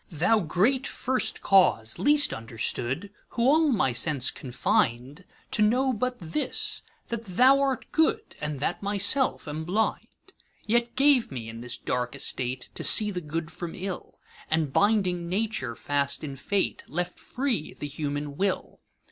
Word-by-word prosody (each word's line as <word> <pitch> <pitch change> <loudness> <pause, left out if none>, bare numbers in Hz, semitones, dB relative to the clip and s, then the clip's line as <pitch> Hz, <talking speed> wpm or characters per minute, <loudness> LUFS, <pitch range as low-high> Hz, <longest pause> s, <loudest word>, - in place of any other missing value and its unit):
Thou 180 +7 +2
Great 210 - +1
First 260 0 -2
Cause, 180 - +3
least 295 +1 +3
understood, 120 - -3 0.3
Who 235 - +2
all 310 +5 +4
my 165 - +1
sense 130 +1 +1
confin'dTo 125 +3 -1 0.4
know 250 +5 +3
but 250 +3 -2
this, 305 - -2 0.3
that 230 -1 -4
thou 255 +9 +5
art 270 -3 0
good, 375 +8 +1
And 150 -2 -3
that - - -1
myself 205 - +1
am 150 +2 -4
blind:Yet 220 +4 -3
gave 270 - +4
me, 120 -4 -6
in 115 +1 -8
this 125 0 -5
dark 125 +1 -2
estate, 125 -2 -2
To - - -4
see 210 -1 +7
the 180 -2 -4
good 160 +1 -4
from 175 0 -7
ill; 190 0 -6 0.3
And 155 -3 0
binding 185 -5 +2
Nature 190 - -2
fast 140 +2 -1
in 140 -3 -5
Fate, 190 +9 -1
Left 175 +2 -4
free 250 - -3
the 145 - -6
human 145 0 -4
Will. 195 -1 -2
180 Hz, 145 wpm, -27 LUFS, 145-235 Hz, 0.4 s, see